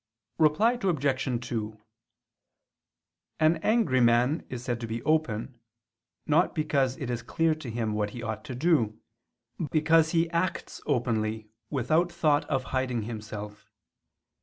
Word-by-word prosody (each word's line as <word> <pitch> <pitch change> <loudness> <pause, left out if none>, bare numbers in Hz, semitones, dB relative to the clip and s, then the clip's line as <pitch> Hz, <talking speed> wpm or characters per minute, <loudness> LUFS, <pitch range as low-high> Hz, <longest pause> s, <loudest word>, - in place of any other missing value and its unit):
Reply 190 +11 +3
Obj. 135 - 0
2: 110 -2 -4 1.6
An 155 +1 +4
angry 160 - +2
man 120 +6 +3
is 125 -1 -6
said 120 -2 -2
to 115 - -4
be 115 +1 -4
open, 130 -6 0 0.7
not 160 +4 +2
because 140 -5 +1
it 130 -3 -4
is 120 -1 -2
clear 160 +7 +1
to 155 -5 -7
him 110 -1 -2
what 105 -1 -1
he 120 +2 -8
ought 110 -1 -4
to 130 - -6
do, 120 -7 +1 0.6
but 155 - -2
because 160 +1 +4
he 165 0 +2
acts 170 +2 -2
openly, 110 -5 -1 0.2
without 155 +6 +1
thought 155 -3 +2
of 135 -3 -1
hiding 130 -3 0
himself. 105 -1 -7
130 Hz, 135 wpm, -28 LUFS, 115-155 Hz, 1.6 s, An